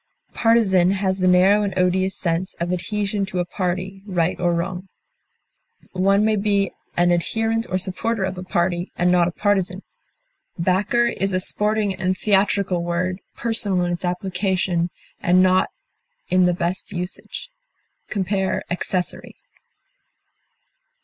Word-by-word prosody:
Partisan 195 Hz, -6 st, +3 dB
has 190 Hz, -1 st, -1 dB
the 185 Hz, -, +2 dB
narrow 185 Hz, +3 st, +5 dB
and 195 Hz, -3 st, -2 dB
odious 185 Hz, +1 st, +1 dB
sense 175 Hz, +1 st, -1 dB
of 175 Hz, +1 st, -2 dB
adhesion 205 Hz, +2 st, -1 dB
to 185 Hz, -, -5 dB
a 175 Hz, -, +1 dB
party, 185 Hz, +1 st, -3 dB
right 175 Hz, -3 st, 0 dB
or 175 Hz, -1 st, +2 dB
wrong. 180 Hz, +2 st, -3 dB, 1.0 s
One 195 Hz, +2 st, +3 dB
may 220 Hz, -1 st, +2 dB
be 200 Hz, -1 st, +1 dB, 0.3 s
an 175 Hz, 0 st, +4 dB
adherent 225 Hz, +6 st, 0 dB
or 185 Hz, -, +1 dB
supporter 195 Hz, +3 st, -1 dB
of 190 Hz, 0 st, -2 dB
a 180 Hz, -, -6 dB
party 175 Hz, -1 st, -1 dB
and 180 Hz, +1 st, +3 dB
not 175 Hz, -1 st, +4 dB
a -, -, -2 dB
partisan. 190 Hz, -1 st, 0 dB, 0.7 s
Backer 190 Hz, +7 st, +2 dB
is 195 Hz, -4 st, -1 dB
a 185 Hz, -, +2 dB
sporting 210 Hz, +1 st, 0 dB
and 185 Hz, 0 st, -1 dB
theatrical 195 Hz, -3 st, +1 dB
word, 180 Hz, +2 st, -1 dB, 0.2 s
personal 210 Hz, -6 st, 0 dB
in 175 Hz, -, -1 dB
its 175 Hz, -, -5 dB
application, 180 Hz, -1 st, -1 dB, 0.3 s
and 180 Hz, +1 st, +4 dB
not 185 Hz, 0 st, +3 dB, 0.6 s
in 185 Hz, 0 st, +4 dB
the 180 Hz, -, +2 dB
best 175 Hz, +3 st, -2 dB
usage. 180 Hz, -, -6 dB, 0.6 s
Compare 190 Hz, -1 st, -1 dB
ACCESSORY. 180 Hz, 0 st, -2 dB
185 Hz, 135 wpm, -22 LUFS, 180-200 Hz, 1.0 s, narrow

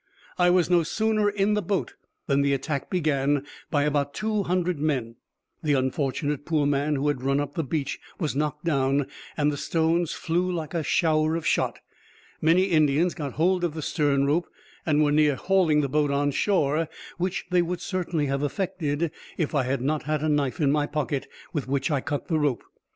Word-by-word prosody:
I 180 Hz, 0 st, +5 dB
was 180 Hz, -1 st, +4 dB
no 175 Hz, -1 st, +4 dB
sooner 215 Hz, +5 st, +1 dB
in 205 Hz, 0 st, +1 dB
the 210 Hz, -, +1 dB
boat 180 Hz, -, -2 dB, 0.3 s
than 140 Hz, 0 st, +2 dB
the 140 Hz, 0 st, +2 dB
attack 140 Hz, +1 st, -3 dB
began 145 Hz, -5 st, +1 dB, 0.2 s
by 145 Hz, -1 st, +2 dB
about 145 Hz, -1 st, 0 dB
two 215 Hz, -1 st, 0 dB
hundred 180 Hz, -3 st, 0 dB
men; 130 Hz, -7 st, -1 dB, 0.4 s
the 150 Hz, -3 st, +1 dB
unfortunate 140 Hz, +2 st, -1 dB
poor 155 Hz, -2 st, +1 dB
man 145 Hz, +1 st, +1 dB
who 140 Hz, +1 st, 0 dB
had 145 Hz, -4 st, 0 dB
run 135 Hz, +2 st, +1 dB
up 145 Hz, -, -3 dB
the 165 Hz, -, -1 dB
beach 140 Hz, 0 st, -2 dB, 0.2 s
was 155 Hz, -7 st, -1 dB
knocked 150 Hz, +2 st, -2 dB
down, 140 Hz, -3 st, +2 dB, 0.3 s
and 150 Hz, 0 st, +2 dB
the 145 Hz, -, -4 dB
stones 165 Hz, +2 st, +1 dB
flew 175 Hz, +3 st, -1 dB
like 165 Hz, -3 st, -4 dB
a 170 Hz, -, 0 dB
shower 155 Hz, +1 st, +2 dB
of 165 Hz, -2 st, -3 dB
shot. -, -, 0 dB, 0.6 s
Many 165 Hz, +4 st, +4 dB
Indians 160 Hz, -1 st, +3 dB
got 145 Hz, -4 st, -5 dB
hold 180 Hz, +3 st, +2 dB
of 165 Hz, -3 st, -1 dB
the 155 Hz, -, -4 dB
stern 145 Hz, -3 st, +1 dB
rope, 155 Hz, +5 st, +1 dB, 0.4 s
and 155 Hz, -1 st, +4 dB
were 145 Hz, -, +2 dB
near 150 Hz, -1 st, +4 dB
hauling 175 Hz, -3 st, +3 dB
the 140 Hz, -, 0 dB
boat 150 Hz, +1 st, +1 dB
on 145 Hz, +1 st, +1 dB
shore, 160 Hz, -2 st, +1 dB, 0.3 s
which 180 Hz, +1 st, -1 dB
they 180 Hz, -1 st, +4 dB
would 175 Hz, +1 st, -2 dB
certainly 175 Hz, -4 st, -2 dB
have 140 Hz, 0 st, -1 dB
effected, 155 Hz, -1 st, -1 dB, 0.3 s
if 160 Hz, -1 st, -1 dB
I 140 Hz, -4 st, +2 dB
had 130 Hz, 0 st, -1 dB
not 150 Hz, +2 st, -1 dB
had 155 Hz, 0 st, -1 dB
a 155 Hz, -, +1 dB
knife 145 Hz, -3 st, 0 dB
in 145 Hz, -3 st, +3 dB
my 145 Hz, 0 st, +1 dB
pocket, 145 Hz, -2 st, -2 dB, 0.3 s
with 145 Hz, -5 st, -2 dB
which 140 Hz, +3 st, 0 dB
I 140 Hz, -3 st, +1 dB
cut 145 Hz, +2 st, -3 dB
the 160 Hz, -2 st, +1 dB
rope. 145 Hz, -5 st, 0 dB
150 Hz, 200 wpm, -26 LUFS, 140-170 Hz, 0.6 s, I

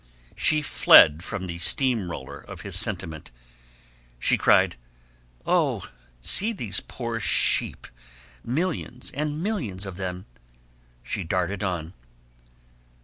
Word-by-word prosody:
She 150 Hz, 0 st, +2 dB
fled 80 Hz, -, +6 dB
from 100 Hz, -2 st, -5 dB
the 85 Hz, -1 st, -6 dB
steam 115 Hz, 0 st, +2 dB
roller 65 Hz, -6 st, -8 dB
of -, -, -11 dB
his -, -, -6 dB
sentiment. 80 Hz, -2 st, -2 dB, 0.9 s
She -, -, +2 dB
cried, -, -, +3 dB, 0.7 s
"Oh, -, -, 0 dB, 0.3 s
see 215 Hz, -, +4 dB
those 120 Hz, -, -2 dB
poor 115 Hz, -2 st, -5 dB
sheep 105 Hz, -, +1 dB, 0.6 s
millions 125 Hz, -3 st, -3 dB
and 150 Hz, +3 st, -3 dB
millions 120 Hz, -, -3 dB
of 95 Hz, -2 st, -8 dB
them." 90 Hz, -1 st, -5 dB, 0.8 s
She 95 Hz, -, -4 dB
darted 90 Hz, +3 st, -2 dB
on. 85 Hz, -3 st, -3 dB
100 Hz, 110 wpm, -25 LUFS, 90-130 Hz, 0.9 s, fled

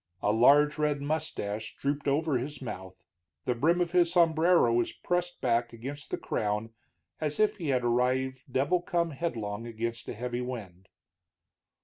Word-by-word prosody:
A 105 Hz, -, +3 dB
large 145 Hz, +7 st, +5 dB
red 150 Hz, -1 st, +1 dB
mustache 140 Hz, -8 st, -3 dB
drooped 145 Hz, +1 st, -1 dB
over 145 Hz, -1 st, +2 dB
his 145 Hz, +4 st, -5 dB
mouth, 95 Hz, -7 st, -8 dB, 0.4 s
the 125 Hz, -, +2 dB
brim 160 Hz, +9 st, +2 dB
of 175 Hz, -1 st, 0 dB
his 175 Hz, -1 st, +3 dB
sombrero 165 Hz, -5 st, +4 dB
was 120 Hz, 0 st, +1 dB
pressed 175 Hz, 0 st, -2 dB
back 120 Hz, -1 st, +1 dB
against 135 Hz, +5 st, -7 dB
the -, -, -2 dB
crown 105 Hz, +1 st, -2 dB, 0.5 s
as 150 Hz, -1 st, -2 dB
if 215 Hz, 0 st, +3 dB
he 170 Hz, -5 st, -4 dB
had 130 Hz, -3 st, +1 dB
arrived 130 Hz, +2 st, 0 dB
devil 145 Hz, +8 st, +2 dB
come 170 Hz, -1 st, 0 dB
headlong 115 Hz, -8 st, -3 dB
against 115 Hz, 0 st, -4 dB
a -, -, -3 dB
heavy 120 Hz, +2 st, -3 dB
wind. 100 Hz, -8 st, -7 dB
130 Hz, 155 wpm, -29 LUFS, 115-160 Hz, 0.5 s, large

